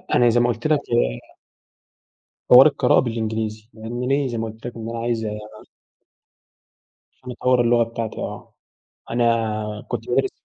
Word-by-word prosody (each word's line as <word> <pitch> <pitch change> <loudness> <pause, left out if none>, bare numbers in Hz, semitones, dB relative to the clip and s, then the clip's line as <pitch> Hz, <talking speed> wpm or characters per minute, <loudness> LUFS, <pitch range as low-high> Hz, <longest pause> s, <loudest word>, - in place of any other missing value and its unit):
أنا 120 -1 +5
زي 120 +1 +3
ما 120 - +3
قلت 120 +4 -2
لك 155 -2 +3
آآ - - -1 1.2
حوار 130 +4 +10
القراءة 135 -4 +3
بالإنجليزي 110 -2 -3
يعني 120 +3 -5
ليه 140 +1 +1
زي 120 -2 -4
ما 115 - -2
قُلت 110 +1 -13
لك 120 - -8
إن 115 -1 -6
أنا 115 0 -5
عايز 115 -1 -2 1.9
عشان 125 - -10
أطوّر 125 0 +2
اللغة 120 0 +3
بتاعتي 115 -1 -5
آه - - -7 0.6
أنا 120 0 +1 0.6
كنت - - -5
بادرس - - +1
120 Hz, 150 wpm, -22 LUFS, 110-125 Hz, 1.9 s, حوار